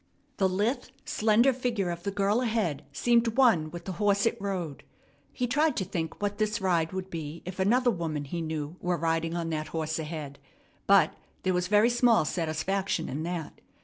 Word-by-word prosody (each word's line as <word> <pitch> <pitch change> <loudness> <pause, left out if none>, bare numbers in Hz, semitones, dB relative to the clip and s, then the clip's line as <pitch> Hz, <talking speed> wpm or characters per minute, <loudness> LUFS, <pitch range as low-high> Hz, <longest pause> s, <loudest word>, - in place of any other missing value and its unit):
The 190 -1 +3
lithe, 210 +8 0 0.2
slender 235 -3 +3
figure 235 -8 -1
of 170 0 -5
the 200 - -2
girl 200 +3 +1
ahead 215 - 0
seemed 235 - +2
one 220 -13 +4
with 175 +1 -8
the 190 - -3
horse 200 0 +3
it 230 - +2
rode. 180 -7 -3 0.5
He 250 - -2
tried 295 +6 +2
to 190 - 0
think 165 -3 -4
what 205 0 -2
this 215 0 0
ride 170 -4 +1
would 190 0 -5
be 160 -1 -6
if 185 +1 -7
another 245 +6 +3
woman 160 -6 -3
he 170 +5 -4
knew 155 0 -4
were 180 -1 0
riding 165 +1 0
on 165 -1 -2
that 155 -1 -2
horse 160 0 -2
ahead, 150 -3 -6 0.5
but - - +5 0.3
there 185 - +1
was 180 0 0
very 210 +4 +4
small 240 -7 +4
satisfaction 170 +2 -1
in 145 +4 -3
that. 170 -1 -5
185 Hz, 185 wpm, -28 LUFS, 165-215 Hz, 0.5 s, but